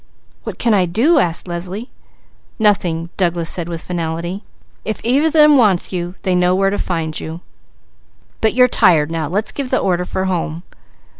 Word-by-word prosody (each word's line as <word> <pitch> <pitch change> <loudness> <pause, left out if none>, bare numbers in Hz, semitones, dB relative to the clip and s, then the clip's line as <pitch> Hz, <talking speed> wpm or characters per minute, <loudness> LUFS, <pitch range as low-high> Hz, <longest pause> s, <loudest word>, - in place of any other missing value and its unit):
"What - - -6
can 230 -2 +1
I 185 -3 +2
do?" 255 - +3
asked 170 -5 +1
Leslie. 180 +7 -6 0.7
"Nothing!" 175 -6 +1
Douglas 170 -3 0
said 175 -1 -1
with 165 -1 -5
finality. 170 +2 -4 0.4
"If 220 - -4
either 270 +7 +2
of 320 - -2
them 300 -2 +6
wants 195 -6 +2
you, 175 0 -4
they 185 - 0
know 180 0 +2
where 195 +1 +1
to 205 - -2
find 160 -3 -3
you. 160 +2 -7 1.0
But 220 +1 +1
you're 250 0 +6
tired 170 -10 +3
now. 165 -2 -2
Let's 205 +7 0
give 275 -3 -5
the 260 - +1
order 180 -1 0
for 190 +1 -3
home." 170 -2 -3
180 Hz, 175 wpm, -17 LUFS, 170-220 Hz, 1.0 s, them